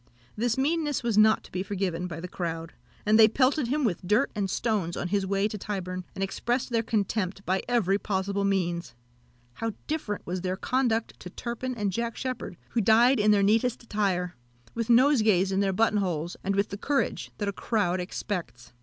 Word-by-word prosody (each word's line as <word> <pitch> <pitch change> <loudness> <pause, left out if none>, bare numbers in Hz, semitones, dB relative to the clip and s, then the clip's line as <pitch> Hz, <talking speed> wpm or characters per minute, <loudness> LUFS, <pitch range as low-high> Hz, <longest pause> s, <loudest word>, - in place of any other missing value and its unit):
This 230 +2 0
meanness 295 0 0
was 235 -3 0
not 215 +1 +5
to - - -15
be 185 - -2
forgiven 185 -3 -2
by 165 -2 -6
the 180 - -5
crowd; 165 -2 -4 0.3
and 215 +1 +4
they 220 - +9
pelted 260 +4 +2
him 290 +4 0
with 200 -9 0
dirt 210 +9 +2
and 200 -2 -1
stones 195 -6 -1
on 175 - -3
his 200 0 0
way 195 +1 +1
to 210 -1 -6
Tyburn, 185 -2 -4
and 195 - -2
expressed 240 +6 -1
their 230 -1 +2
contempt 205 -3 -1
by 190 +1 +1
every 200 -5 +2
possible 200 0 -1
means. 175 -8 -1 0.6
How 225 - -3
different 295 -10 -3
was 180 +1 -3
their 185 +1 -2
conduct 235 -1 0
to 180 - -8
Turpin 240 +5 -4
and 205 -3 -1
Jack 235 +1 -2
Sheppard, 255 -9 -4
who 235 - 0
died 230 +5 +5
in 210 0 +3
their 205 -1 +5
neatest 230 +4 +2
attire, 190 -5 -1 0.4
with 230 -1 -3
nosegays 225 -7 +4
in 190 - +1
their 200 -1 +2
button 215 +2 +2
holes, 175 -3 -2
and 195 +1 0
with 200 +1 +1
the 200 - -6
courage 280 +5 -1
that 205 - -2
a 200 - -1
crowd 190 -4 0
expects. 170 - -5
205 Hz, 195 wpm, -27 LUFS, 185-230 Hz, 0.6 s, they